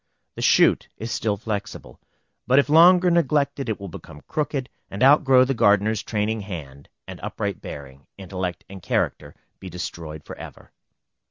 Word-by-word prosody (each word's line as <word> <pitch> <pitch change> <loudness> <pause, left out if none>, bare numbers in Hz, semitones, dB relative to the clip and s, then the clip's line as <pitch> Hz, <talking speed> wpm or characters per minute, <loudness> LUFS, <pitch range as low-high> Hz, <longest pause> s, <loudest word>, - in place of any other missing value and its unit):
The - - -8
shoot - - +4
is 115 +1 -6
still 105 -2 -1
flexible; 100 - -6 0.5
but 130 +2 +4
if 140 0 +4
longer 175 +3 +6
neglected 140 -5 +1
it 110 - -2
will 100 - -7
become 80 -3 -11
crooked, 145 -3 -2 0.2
and 100 +5 -3
outgrow 135 -2 +6
the 135 - -1
gardener's 105 -1 +2
training 110 0 -2
hand, 75 -8 -9 0.2
and - - -9
upright - - -4
bearing, 70 -1 -10
intellect, 95 -2 -5
and 95 -1 -11
character, 85 - -2 0.2
be 95 - -9
destroyed 80 -3 -7
forever. - - -11
105 Hz, 150 wpm, -23 LUFS, 90-135 Hz, 0.5 s, longer